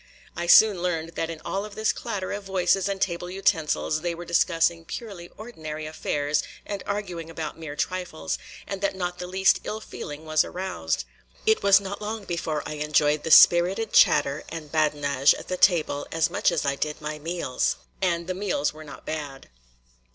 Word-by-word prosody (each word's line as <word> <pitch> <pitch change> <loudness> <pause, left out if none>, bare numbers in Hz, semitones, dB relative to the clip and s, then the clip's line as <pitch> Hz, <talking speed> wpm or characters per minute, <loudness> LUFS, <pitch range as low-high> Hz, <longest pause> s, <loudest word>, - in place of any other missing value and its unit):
I 170 0 -3
soon 205 0 +7
learned 165 -2 -1
that 165 -1 -3
in 165 -1 -6
all 195 +1 -2
of 210 -1 -9
this 220 0 +1
clatter 205 -6 -4
of 205 0 -4
voices 190 0 +1
and 195 -1 -2
table 175 -2 -2
utensils 160 -4 0
they 175 0 -2
were 175 +1 -8
discussing 170 -1 +2
purely 185 -1 -7
ordinary 155 -9 -7
affairs 150 -1 -1 0.2
and 200 -2 -4
arguing 180 -5 -4
about 160 -2 -5
mere 155 -3 -6
trifles, 150 - -3 0.3
and 195 -1 -5
that 200 -1 0
not 180 -1 -3
the 180 - -5
least 190 +1 +3
ill 215 - -4
feeling 150 -7 -8
was 155 -1 +3
aroused. 185 +1 -3 0.4
It 440 0 +3
was 200 0 +6
not 200 +1 -6
long 215 0 -4
before 165 -4 -3
I 150 - -5
enjoyed 150 0 +2
the 160 - -4
spirited 180 +7 +6
chatter 145 0 +4
and 155 -3 -7
badinage 145 -3 +3
at - - -10
the 185 - 0
table 165 -6 +2
as 165 0 +1
much - - +2
as - - -1
I 140 0 +1
did 150 +2 -3
my 150 0 -5
meals 165 -5 -1 0.3
and 170 -2 0
the 185 - -2
meals 180 -7 -1
were 155 +1 -11
not 145 - -12
bad. 145 -4 -6
170 Hz, 185 wpm, -25 LUFS, 155-190 Hz, 0.4 s, soon